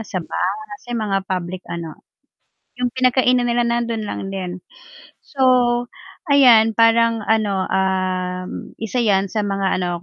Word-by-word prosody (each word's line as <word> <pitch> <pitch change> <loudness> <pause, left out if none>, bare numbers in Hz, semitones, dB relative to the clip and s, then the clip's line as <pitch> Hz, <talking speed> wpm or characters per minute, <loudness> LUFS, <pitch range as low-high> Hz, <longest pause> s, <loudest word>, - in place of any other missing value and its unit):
sa 215 -3 -7
bus, 215 +9 -4
sa 245 - -9
mga 195 -3 -2
public 180 0 -3
ano, 165 -2 -7 0.8
'yung 245 -1 -2
pinagkainan 255 -1 +2
nila, 240 0 +1
nandun 235 -2 -1
lang 200 -1 -5
din. 185 -2 -5 0.6
So 275 - -18 0.9
'ayan, 240 -6 +6
parang 230 -1 +3
ano, 205 -4 +1
ah, 185 -1 -1 0.4
isa 225 +3 -2
'yan 195 -2 +1
sa 220 - -1
mga 195 -2 -1
ano, 180 - -1
215 Hz, 130 wpm, -20 LUFS, 190-235 Hz, 0.9 s, ayan